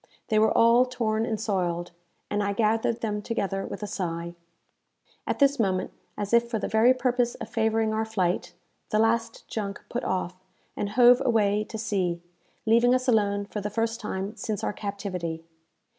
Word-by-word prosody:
They 215 -2 +3
were 220 0 +5
all 235 +2 +5
torn 225 -3 -1
and 220 - -2
soiled, 175 -5 -1 0.4
and 205 0 +1
I 200 0 0
gathered 225 +2 +1
them 210 -2 -2
together 200 -3 -2
with - - -6
a - - -1
sigh. 170 -5 -4 0.9
At - - 0
this 280 -1 +3
moment, 190 -4 0 0.3
as 205 +1 -4
if 235 0 +4
for 230 - -1
the - - -2
very 220 +3 +5
purpose 250 -2 +1
of - - -8
favouring 220 -1 +1
our 220 0 0
flight, 180 -5 -1 0.3
the 215 - +1
last 225 +1 0
junk 200 -3 -4
put 245 - -3
off, 185 -1 -2 0.4
and 205 - -2
hove 245 +3 +6
away 210 -4 +2
to 220 - -7
sea, 190 -6 -1 0.5
leaving 235 +3 +5
us 255 +1 -1
alone 205 -4 +2
for 210 0 -5
the 210 - -3
first 225 +2 -1
time 195 0 -4
since 215 -5 -4
our - - -1
captivity. 185 -6 -4
215 Hz, 175 wpm, -26 LUFS, 200-230 Hz, 0.9 s, hove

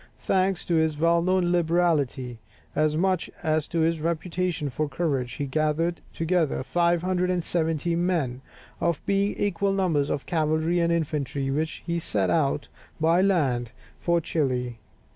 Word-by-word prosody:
Thanks 190 -1 +1
to 175 - -1
his 160 -2 +2
well 170 +2 +3
known 185 0 +2
liberality, 160 -8 +1 0.4
as 155 0 +2
much 185 0 +1
as 155 -1 +1
to 165 - -1
his 165 0 +1
reputation 170 -1 -1
for 150 +4 -2
courage, 135 -8 -1
he 145 - -3
gathered 155 +4 0
together 165 -5 0
570 175 0 +1
men, 165 -8 0 0.4
of 170 -3 +1
about - - 0
equal 200 -1 +1
numbers 165 -7 +1
of 140 - -2
cavalry 160 +1 +1
and 170 0 +2
infantry, 145 -4 -1
with 140 - 0
which 160 0 -4
he 170 0 -1
set 100 - 0
out 145 -2 +1 0.3
by 165 +3 +4
land 135 - +1 0.3
for 170 0 +2
Chili. 125 -7 -1
165 Hz, 145 wpm, -26 LUFS, 145-175 Hz, 0.4 s, by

